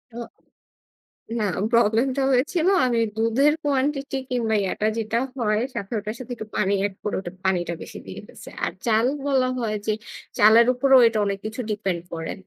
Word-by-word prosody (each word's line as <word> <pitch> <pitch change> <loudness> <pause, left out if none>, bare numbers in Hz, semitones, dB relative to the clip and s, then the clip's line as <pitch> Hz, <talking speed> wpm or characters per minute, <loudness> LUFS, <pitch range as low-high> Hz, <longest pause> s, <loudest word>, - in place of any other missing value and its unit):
উম 235 -1 -6 1.1
না। 215 - 0 0.3
প্রব্লেমটা 235 +4 +2
হয়েছিল 315 +7 +1 0.2
আমি 240 -2 +1 0.2
দুধের 230 +6 +3
quantity 275 0 0
কিংবা 235 -3 0
ইয়াটা 195 +2 -1
যেটা 225 +1 -1 0.2
হয় 215 -4 +1
সাথে 205 -4 -6
ওটার 210 +1 -5
সাথে 255 -1 -7
একটু 220 - -7
পানি 195 0 +1
এড 205 - -1
করে 210 - -3
ওটা 175 -2 -8
পানিটা 180 -2 0
বেশি - - -9
দিয়ে - - -8
ফেলছি। - - -13 0.2
আর - - -2
চাল 225 +1 +3 0.2
বলা 265 -2 +2
হয় 225 -3 -2
যে 215 - +2 0.5
চালের 220 +3 +7
উপরেও 265 +1 +5
এটা 225 -1 -2
অনেক 200 -1 -2
কিছু 220 +3 -5
depend 195 -5 -2
করে। 165 -1 -4
225 Hz, 170 wpm, -23 LUFS, 210-255 Hz, 1.1 s, চালের